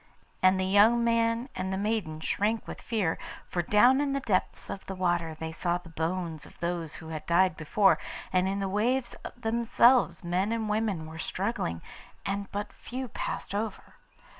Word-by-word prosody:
And 185 Hz, 0 st, +5 dB
the 190 Hz, -, +1 dB
young 210 Hz, +5 st, +5 dB
man 230 Hz, +1 st, +2 dB
and 190 Hz, 0 st, -2 dB
the 190 Hz, -, -1 dB
maiden 200 Hz, -7 st, -1 dB
shrank 215 Hz, +7 st, 0 dB
with -, -, -7 dB
fear, 205 Hz, -9 st, -1 dB, 0.3 s
for 175 Hz, -, -1 dB
down 245 Hz, -, +5 dB
in 280 Hz, -1 st, 0 dB
the 275 Hz, -, +1 dB
depths 210 Hz, -8 st, -1 dB
of 195 Hz, -, -6 dB
the 190 Hz, -, -4 dB
water 175 Hz, -3 st, 0 dB
they 160 Hz, 0 st, -4 dB
saw 175 Hz, +2 st, 0 dB
the 175 Hz, -1 st, -13 dB
bones 165 Hz, -1 st, -3 dB
of -, -, -15 dB
those 170 Hz, -2 st, -3 dB
who 160 Hz, -, -9 dB
had 155 Hz, -1 st, -5 dB
died 180 Hz, +2 st, +4 dB
before, 195 Hz, +6 st, +3 dB, 0.3 s
and 185 Hz, 0 st, +3 dB
in 195 Hz, +1 st, -1 dB
the 195 Hz, -, -1 dB
waves 235 Hz, +6 st, 0 dB, 0.2 s
themselves 235 Hz, +1 st, +3 dB
men 180 Hz, +5 st, 0 dB
and 225 Hz, -1 st, -1 dB
women 210 Hz, -6 st, 0 dB
were 160 Hz, +1 st, -9 dB
struggling, 185 Hz, -, -2 dB, 0.4 s
and 200 Hz, 0 st, -3 dB
but 205 Hz, +1 st, -4 dB
few 255 Hz, 0 st, -6 dB
passed -, -, -4 dB
over. 210 Hz, 0 st, -4 dB
195 Hz, 180 wpm, -29 LUFS, 175-225 Hz, 0.4 s, And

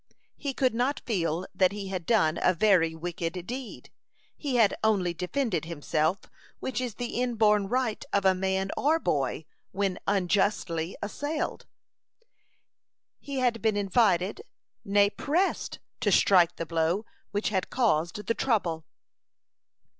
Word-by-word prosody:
He 280 Hz, -3 st, -4 dB
could 255 Hz, -3 st, +2 dB
not 250 Hz, +5 st, 0 dB
feel 175 Hz, -5 st, -1 dB
that 185 Hz, -1 st, +3 dB
he 200 Hz, -1 st, -6 dB
had 185 Hz, -3 st, -4 dB
done 175 Hz, -9 st, +3 dB
a 185 Hz, -, +3 dB
very 170 Hz, -5 st, +3 dB
wicked 175 Hz, +1 st, -4 dB
deed. 250 Hz, +2 st, -7 dB, 0.4 s
He 280 Hz, -4 st, -3 dB
had 225 Hz, -4 st, +4 dB
only 195 Hz, -5 st, +2 dB
defended 180 Hz, -, -2 dB
himself, 160 Hz, +2 st, -1 dB, 0.4 s
which 255 Hz, -1 st, -3 dB
is 245 Hz, -4 st, -4 dB
the 245 Hz, 0 st, -3 dB
inborn 215 Hz, -5 st, +2 dB
right 245 Hz, -1 st, -1 dB
of 200 Hz, -, +1 dB
man 190 Hz, +1 st, -1 dB
or 310 Hz, +3 st, +2 dB
boy 145 Hz, -, -1 dB, 0.3 s
when 195 Hz, -1 st, -1 dB
unjustly 190 Hz, -3 st, 0 dB
assailed. 290 Hz, +9 st, -3 dB, 1.5 s
He 280 Hz, -1 st, -6 dB
had 240 Hz, -2 st, +1 dB
been 220 Hz, -2 st, +1 dB
invited, 200 Hz, -, +2 dB, 0.4 s
nay, 200 Hz, 0 st, +3 dB
pressed, 340 Hz, -, -1 dB, 0.2 s
to -, -, +1 dB
strike 180 Hz, -4 st, +5 dB
the 165 Hz, -, -4 dB
blow 165 Hz, +5 st, 0 dB, 0.2 s
which 205 Hz, +1 st, -1 dB
had 190 Hz, -3 st, -1 dB
caused 210 Hz, -5 st, 0 dB
the 230 Hz, -, +1 dB
trouble. 175 Hz, -11 st, 0 dB
200 Hz, 130 wpm, -28 LUFS, 175-235 Hz, 1.5 s, strike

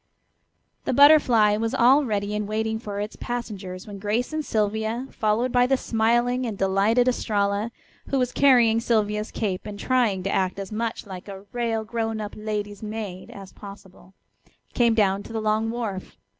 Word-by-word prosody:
The -, -, 0 dB
Butterfly 245 Hz, -7 st, +6 dB
was 225 Hz, +1 st, -1 dB
all 265 Hz, +5 st, +5 dB
ready 205 Hz, -2 st, -2 dB
and 210 Hz, -1 st, -2 dB
waiting 220 Hz, +1 st, -1 dB
for 205 Hz, -3 st, -6 dB
its 210 Hz, +1 st, -4 dB
passengers 200 Hz, -7 st, -5 dB
when 205 Hz, -2 st, -9 dB
Grace 220 Hz, +8 st, -1 dB
and 310 Hz, 0 st, -1 dB
Sylvia, 220 Hz, +2 st, -1 dB
followed 220 Hz, +4 st, 0 dB
by 245 Hz, 0 st, +3 dB
the 270 Hz, +1 st, +2 dB
smiling 240 Hz, +2 st, +1 dB
and 215 Hz, -3 st, -5 dB
delighted 200 Hz, +6 st, +2 dB
Estralla, 205 Hz, -3 st, 0 dB, 0.4 s
who 275 Hz, -, 0 dB
was 250 Hz, -2 st, 0 dB
carrying 240 Hz, -5 st, +4 dB
Sylvia's 215 Hz, -2 st, 0 dB
cape 200 Hz, -1 st, -3 dB
and 205 Hz, -1 st, -7 dB
trying 230 Hz, -8 st, +1 dB
to 195 Hz, -, -1 dB
act 185 Hz, 0 st, 0 dB
as 195 Hz, 0 st, -6 dB
much 225 Hz, +1 st, -3 dB
like 190 Hz, -2 st, -9 dB
a 195 Hz, -1 st, -9 dB
"rale 230 Hz, -2 st, -1 dB
grown 225 Hz, 0 st, -3 dB
up 210 Hz, -1 st, -5 dB
lady's 210 Hz, -1 st, -4 dB
maid" 210 Hz, -4 st, -6 dB
as 195 Hz, -1 st, -11 dB
possible, 195 Hz, -2 st, -13 dB, 0.6 s
came 235 Hz, -2 st, +3 dB
down 200 Hz, -2 st, +2 dB
to 225 Hz, -, -10 dB
the 225 Hz, -, -1 dB
long 215 Hz, +1 st, 0 dB
wharf. 225 Hz, -5 st, -5 dB
215 Hz, 170 wpm, -24 LUFS, 205-235 Hz, 0.6 s, Butterfly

